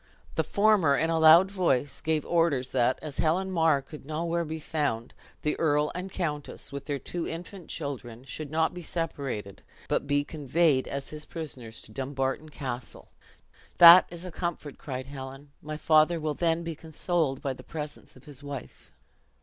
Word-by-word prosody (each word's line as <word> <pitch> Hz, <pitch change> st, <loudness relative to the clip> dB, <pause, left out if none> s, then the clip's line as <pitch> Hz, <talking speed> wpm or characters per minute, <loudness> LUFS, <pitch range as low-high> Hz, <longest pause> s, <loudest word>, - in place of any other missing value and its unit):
The -, -, +1 dB
former, 200 Hz, -8 st, +4 dB
in 160 Hz, +3 st, +1 dB
a 165 Hz, -, +2 dB
loud 165 Hz, +4 st, +8 dB
voice, 145 Hz, -8 st, 0 dB
gave 155 Hz, -1 st, 0 dB
orders 160 Hz, -7 st, +1 dB
that, 130 Hz, 0 st, +2 dB
as 150 Hz, -3 st, -7 dB
Lady -, -, +2 dB
Helen 185 Hz, +4 st, +1 dB
Mar 160 Hz, -5 st, +3 dB
could 150 Hz, +2 st, -11 dB
nowhere 165 Hz, +3 st, -1 dB
be 160 Hz, 0 st, -5 dB
found, 145 Hz, -7 st, -2 dB, 0.3 s
the 150 Hz, -, +1 dB
earl 150 Hz, -1 st, +2 dB
and 185 Hz, +2 st, -5 dB
countess, 150 Hz, -6 st, -4 dB
with 140 Hz, 0 st, -6 dB
their 145 Hz, -2 st, -2 dB
two 170 Hz, +4 st, -4 dB
infant 175 Hz, +1 st, -7 dB
children, 130 Hz, -6 st, -5 dB
should 145 Hz, +3 st, -6 dB
not 160 Hz, +2 st, +1 dB
be 180 Hz, -, -7 dB
separated, 140 Hz, -, -4 dB, 0.3 s
but -, -, 0 dB
be 145 Hz, 0 st, +2 dB
conveyed 150 Hz, -1 st, +1 dB
as 140 Hz, 0 st, -5 dB
his 155 Hz, 0 st, -5 dB
prisoners 130 Hz, -9 st, -7 dB
to -, -, -12 dB
Dumbarton 135 Hz, +4 st, -2 dB
Castle." 130 Hz, -5 st, -6 dB, 0.7 s
"That 175 Hz, +1 st, +10 dB
is 175 Hz, +1 st, -8 dB
a 180 Hz, -, -6 dB
comfort," 160 Hz, -4 st, -4 dB
cried 130 Hz, -2 st, -5 dB
Helen; 135 Hz, +1 st, -9 dB
"my 155 Hz, 0 st, -5 dB
father 155 Hz, +2 st, +4 dB
will 155 Hz, -1 st, -1 dB
then 165 Hz, +1 st, 0 dB
be 165 Hz, 0 st, -4 dB
consoled 160 Hz, -2 st, -2 dB
by 135 Hz, -, -1 dB
the -, -, -12 dB
presence 150 Hz, -2 st, -7 dB
of 130 Hz, -, -17 dB
his 145 Hz, -2 st, -10 dB
wife." 140 Hz, -1 st, -8 dB
150 Hz, 175 wpm, -28 LUFS, 135-165 Hz, 0.7 s, That